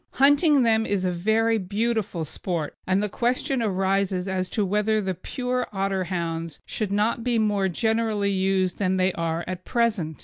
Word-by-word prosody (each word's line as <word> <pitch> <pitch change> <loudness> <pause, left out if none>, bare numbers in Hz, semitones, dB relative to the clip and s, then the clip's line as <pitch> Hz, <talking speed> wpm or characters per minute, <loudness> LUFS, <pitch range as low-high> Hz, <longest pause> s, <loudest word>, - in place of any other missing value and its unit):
Hunting 285 +1 +5
them 225 -1 +3
is 195 -2 0
a 180 - +1
very 220 +5 +1
beautiful 205 -3 -1
sport, 160 0 -4
and 190 +2 +2
the - - +1
question 245 +4 0
arises 195 -2 0
as 185 -1 -1
to 210 - 0
whether 210 +3 +1
the 190 -2 -1
pure 250 +7 -3
Otterhounds 175 -5 -2
should 210 -3 -3
not 215 +3 +1
be 240 -1 +1
more 205 -3 +1
generally 220 +1 0
used 190 -1 0
than 190 -2 +1
they 185 0 +2
are 165 0 -2
at 185 0 -5
present. 215 -10 0
200 Hz, 165 wpm, -25 LUFS, 185-225 Hz, -, Hunting